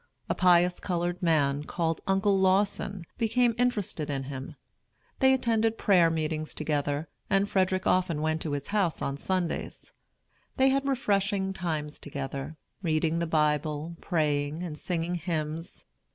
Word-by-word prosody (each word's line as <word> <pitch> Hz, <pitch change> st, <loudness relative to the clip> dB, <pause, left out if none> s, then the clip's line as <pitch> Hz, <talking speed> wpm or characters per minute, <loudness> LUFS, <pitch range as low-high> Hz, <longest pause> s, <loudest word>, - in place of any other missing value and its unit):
A -, -, +1 dB
pious 180 Hz, 0 st, +4 dB
colored 175 Hz, 0 st, -2 dB
man, 145 Hz, -4 st, +2 dB
called 165 Hz, -1 st, -1 dB
Uncle 195 Hz, +1 st, +3 dB
Lawson, 190 Hz, -1 st, +1 dB
became 235 Hz, +1 st, +2 dB
interested 210 Hz, -11 st, 0 dB
in 135 Hz, -2 st, -2 dB
him. 135 Hz, 0 st, -7 dB, 0.6 s
They 265 Hz, -1 st, +5 dB
attended 225 Hz, -3 st, +2 dB
prayer 180 Hz, -5 st, +4 dB
meetings 155 Hz, -1 st, -2 dB
together, 145 Hz, 0 st, -1 dB, 0.2 s
and 195 Hz, -1 st, +3 dB
Frederick 185 Hz, -1 st, +1 dB
often 180 Hz, -4 st, +2 dB
went 155 Hz, +1 st, 0 dB
to 150 Hz, -, -3 dB
his 140 Hz, -1 st, -4 dB
house 200 Hz, -6 st, 0 dB
on 140 Hz, -, -1 dB
Sundays. 180 Hz, +2 st, -3 dB, 0.6 s
They 265 Hz, +1 st, +5 dB
had 275 Hz, +1 st, +1 dB
refreshing 200 Hz, -6 st, +1 dB
times 155 Hz, -5 st, -3 dB
together, 140 Hz, +1 st, -5 dB, 0.2 s
reading 160 Hz, -1 st, +1 dB
the 170 Hz, -, -1 dB
Bible, 150 Hz, +1 st, 0 dB
praying, 150 Hz, -1 st, 0 dB
and 165 Hz, -4 st, -5 dB
singing 170 Hz, +2 st, -2 dB
hymns. 165 Hz, -2 st, -4 dB
170 Hz, 135 wpm, -28 LUFS, 155-195 Hz, 0.6 s, They